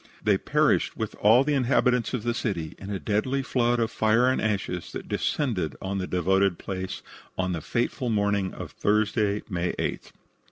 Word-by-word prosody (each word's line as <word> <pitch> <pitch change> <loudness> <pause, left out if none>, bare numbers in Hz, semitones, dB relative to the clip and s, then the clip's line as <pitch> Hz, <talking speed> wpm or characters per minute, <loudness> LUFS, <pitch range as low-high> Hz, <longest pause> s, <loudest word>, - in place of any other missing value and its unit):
They - - +3
perished, - - +1
with - - -3
all 115 +5 +6
the 150 +1 0
inhabitants 125 -3 +2
of 115 - -4
the 120 0 0
city, 90 -10 -3
in 95 - -8
a 100 - -2
deadly 110 - 0
flood 120 -2 +1
of 115 -1 0
fire 110 +3 +3
and 130 - +1
ashes 100 -5 -2
that - - -6
descended 115 - -1
on 95 +1 -3
the 90 - -3
devoted 95 +1 +2
place 95 -1 -5 0.3
on 95 0 0
the 85 - -3
fateful 120 - -1
morning 100 -3 +1
of - - -8
Thursday, 105 0 +1
May 90 -3 -1
8th. - - -4
105 Hz, 175 wpm, -26 LUFS, 95-120 Hz, 0.3 s, all